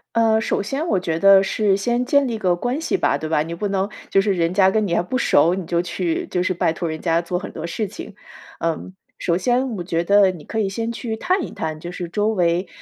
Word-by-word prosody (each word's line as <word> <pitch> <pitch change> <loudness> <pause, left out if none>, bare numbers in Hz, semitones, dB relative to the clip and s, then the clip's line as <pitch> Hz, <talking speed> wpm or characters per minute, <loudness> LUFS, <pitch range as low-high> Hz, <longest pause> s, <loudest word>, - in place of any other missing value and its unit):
呃， 225 -1 +3
首 220 - 0
先 275 +10 -3
我 190 - +2
觉 165 -3 -2
得 195 -1 +7
是 195 0 +1
先 240 +5 0
建 280 +1 +3
立 235 - -2
一 - - -3
个 185 -4 +1
关 250 - -2
系 380 +4 0
吧， - - +1
对 155 - -5
吧？ 150 -2 +2
你 165 +2 -6
不 200 +4 -3
能 195 0 -1 0.2
就 195 - +3
是 200 0 +2
人 170 -1 0
家 190 0 +5
跟 215 +1 +1
你 170 - -2
还 - - +3
不 180 +9 -2
熟， 170 - +3
你 190 -2 -5
就 170 +1 0
去 335 - -2
就 180 - -1
是 185 - 0
拜 165 -2 0
托 170 -1 -3
人 155 0 -4
家 165 -1 +1
做 175 +1 -3
很 195 - -7
多 160 - -5
事 205 +5 -3
情。 - - -9 0.5
嗯， 165 +3 -3 0.3
首 170 -1 +1
先 250 +6 +1
我 175 - -4
觉 170 -2 -1
得 200 +1 +5
你 170 -5 -11
可 220 - -4
以 205 - +1
先 225 +4 -3
去 230 -1 -4
探 365 - 0
一 - - -9
探 155 -1 -4
就 175 +2 -7
是 175 -2 -5
周 210 +4 0
围 180 -3 +1
195 Hz, 285 characters per minute, -21 LUFS, 170-220 Hz, 0.5 s, 得